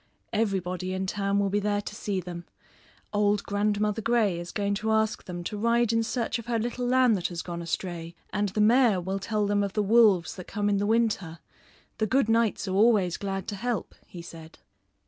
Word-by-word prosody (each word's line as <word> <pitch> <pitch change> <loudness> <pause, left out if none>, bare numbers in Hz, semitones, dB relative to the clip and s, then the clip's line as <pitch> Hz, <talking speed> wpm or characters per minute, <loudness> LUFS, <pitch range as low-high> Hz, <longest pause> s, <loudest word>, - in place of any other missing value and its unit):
Everybody 185 -4 -1
in 190 0 -2
town 200 +1 -1
will 200 -1 +1
be 205 - +2
there 205 0 0
to 205 - -6
see 205 -2 -2
them. 175 -1 -7 0.7
Old 205 0 +2
Grandmother 210 +1 0
Grey 220 -6 +1
is 175 0 -7
going 200 -1 -1
to 220 - -1
ask 220 0 +1
them 175 -1 -6
to 210 +4 -4
ride 235 +1 +2
in 230 - +3
search 235 +1 -2
of 230 - -10
her 235 -1 0
little 240 +2 -2
lamb 255 -1 +4
that 180 -4 0
has 170 -2 -5
gone 170 -1 -5
astray; 170 0 -4 0.2
and 205 0 0
the 210 +3 -1
mayor 230 -2 +5
will 190 +2 -3
tell 210 +1 -1
them 205 0 +1
of 200 -1 -3
the 210 - +1
wolves 205 -5 +4
that 185 - -8
come 205 -1 -1
in 200 - +2
the 205 +1 0
winter. 215 -7 0 0.6
The 220 - +1
good 260 -1 +2
knights 225 -3 +1
are 185 - -2
always 200 -4 +3
glad 195 -1 -4
to 205 - -4
help," 230 -1 -3
he 175 -2 -9
said. 165 -1 -11
205 Hz, 210 wpm, -27 LUFS, 185-220 Hz, 0.7 s, mayor